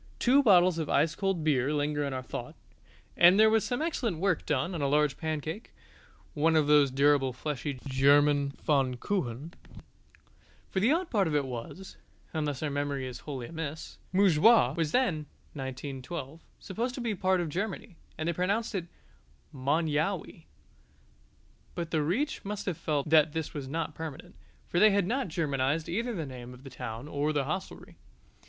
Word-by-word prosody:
Two 265 +3 +4
bottles 180 -7 +5
of 155 - -3
ice 155 0 +2
cold 195 -3 -1
beer 140 -3 +2
linger 145 0 0
in 140 - -2
our 130 -1 -4
thought: - - -7 0.6
and 180 +3 +6
there 220 0 +6
was 220 -1 +3
some 245 +4 -2
excellent 245 - -1
work 180 -1 0
done 145 +5 0
on 165 - -3
a 140 - +1
large 150 0 +2
pancake, 160 - -5 0.6
one 160 +2 +2
of 155 -2 +4
those 145 -1 +5
durable 140 0 +3
fleshy 140 +1 -4
German 140 +1 +4
Pfannkuchen. 140 - -1 1.2
For 190 - 0
the 225 +7 +3
odd 340 +2 0
part 200 -5 +2
of 155 - -1
it 145 -2 +1
was 130 +10 -8 0.4
(unless 150 -3 -2
our 150 - -1
memory 140 -1 -2
is 125 -1 -7
wholly 135 -5 -6
amiss) 160 +1 -6
Montjoie 190 - +5
was 160 -3 -1
then 170 - +1 0.3
(1912) 135 +3 -6 0.2
supposed 235 +6 -3
to 255 - -5
be 230 -2 -1
part 185 -1 +1
of 175 - -1
Germany, 195 +3 -4 0.2
and 155 - -3
they 170 - +1
pronounced 200 +7 -1
it 180 -4 -3 0.6
Mon 145 +5 0
yowey. 160 +2 -2 1.3
But 170 -1 -4
the 155 - +1
Reich 205 - -1
must 205 0 -5
have 180 -5 -2
felt 150 -2 -1
that 155 -1 +5
this 160 -2 -3
was 140 -3 -5
not 160 +2 -3
permanent, 160 +3 -8 0.3
for 175 - 0
they 215 - +7
had 200 -2 +2
not 255 +5 -1
Germanized 155 -2 -1
either 230 +7 -2
the 165 -4 -3
name 125 -2 -9
of 125 - -17
the 135 - -10
town 115 +2 -6
or 145 0 -1
of 155 - -2
the 145 - +2
hostelry. 155 +6 -6
155 Hz, 175 wpm, -29 LUFS, 140-185 Hz, 1.3 s, they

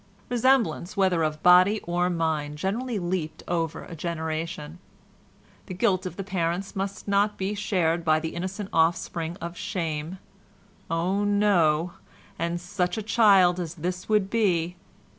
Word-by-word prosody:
Resemblance, 230 -7 +1
whether 185 -4 +3
of 155 -1 -2
body 185 +4 +6
or 175 +1 0
mind, 160 -4 -1
generally 225 +8 -2
leaped 175 -3 -3
over 165 -2 -2
a 170 - -9
generation. 160 -1 -4 0.9
The 185 - -6
guilt 185 0 +1
of 175 - -8
the 195 - -5
parents 180 0 -2
must 195 +1 -4
not 205 +1 +2
be 195 +2 -2
shared 175 -5 0
by 155 -1 +3
the 160 0 -5
innocent 190 +3 -4
offspring 165 +1 0
of 170 +1 -6
shame—oh! 180 +2 -4
no—and 175 -3 0
such 180 +2 -2
a 220 - -3
child 200 -5 +5
as 170 -2 -4
this 180 +4 -4
would 210 -2 +2
be 180 -6 +1
180 Hz, 135 wpm, -26 LUFS, 165-200 Hz, 0.9 s, body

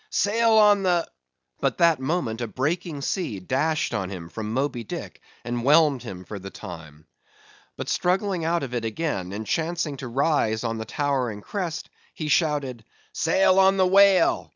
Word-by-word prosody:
—"Sail 230 - +2
on 210 -2 +6
the"—but 65 - -3
that 170 -4 +4
moment 130 -5 -2
a 120 - -2
breaking 150 +5 -2
sea 155 - -2
dashed 135 - -1
on 95 -4 -2
him 85 -4 -7
from 110 +2 -5
Moby 130 -1 -1
Dick, - - -7 0.2
and 120 -1 -3
whelmed 145 -1 +4
him 90 -3 -8
for 105 - -7
the 95 +1 -8
time. 80 -5 -10 0.7
But - - -5
struggling 185 -1 0
out 170 0 0
of 125 -2 -5
it 120 -2 -2
again, 110 - -3
and 105 +2 -5
chancing 160 0 -2
to 135 - -6
rise 120 -4 +1
on 115 -1 -2
a - - -5
towering 125 -5 -1
crest, 170 - -5 0.2
he 155 -2 -4
shouted,—"Sail 150 - +1
on 195 0 +5
the 190 - +4
whale! 195 -1 +4
140 Hz, 160 wpm, -24 LUFS, 110-170 Hz, 0.7 s, on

